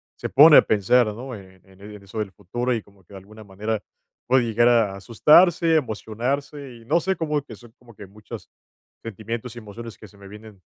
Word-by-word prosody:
se - - -6
pone 150 +1 +7
a - - +9
pensar, 110 +3 +2
¿no? 120 +5 -7
En 95 -2 -15
e 95 - -22 0.2
en 100 - -14
eso 100 +3 -8
del 105 -3 -4
futuro 120 +8 -4
y 115 - -3
como 100 -1 -24
que 95 - -20
de 95 - -9
alguna 105 +3 -15
manera 105 +2 -4 0.5
puede 130 0 +3
llegar 115 +1 +2
a 115 -5 +2
asustarse, 160 - +3
emocionarse, 130 +2 -4
y 115 - -18
no 155 +8 +1
sé, 190 +3 -1
como 150 -3 -2
que 120 -6 -13
son 115 +3 -17
como 120 -3 -19
que 100 - -11
muchos, 105 +2 -12 0.5
sentimientos 115 +2 -7
y - - -8
emociones 115 +1 -11
que 110 - -14
se 100 - -22
me 100 - -14
vienen 105 -2 -14
115 Hz, 210 wpm, -22 LUFS, 105-125 Hz, 0.5 s, a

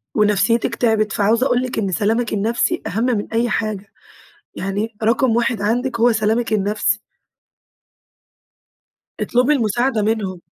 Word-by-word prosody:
ونفسيتِك 215 +3 +2
تعبِت، 220 -2 +1
فعاوزة 225 +4 +2
أقول 245 -2 +2
لِك 255 -3 -3
إن 195 -3 -1
سلامِك 220 +5 0
النفسي، 230 +11 0
أهم 225 +6 -1
من 230 -5 0
أي 235 +1 +1
حاجة، 210 -3 -3 0.6
يعني 205 +3 -3
رقم 230 +1 +2
واحد 235 -3 0
عندِك 235 +3 -1
هو 240 0 +5
سلامِك 220 +1 0
النفسي. 210 +1 +1 2.2
اطلبي 250 +4 +2
المساعدة 240 -2 +1
منهم. 205 -4 -2
220 Hz, 125 wpm, -19 LUFS, 210-240 Hz, 2.2 s, هو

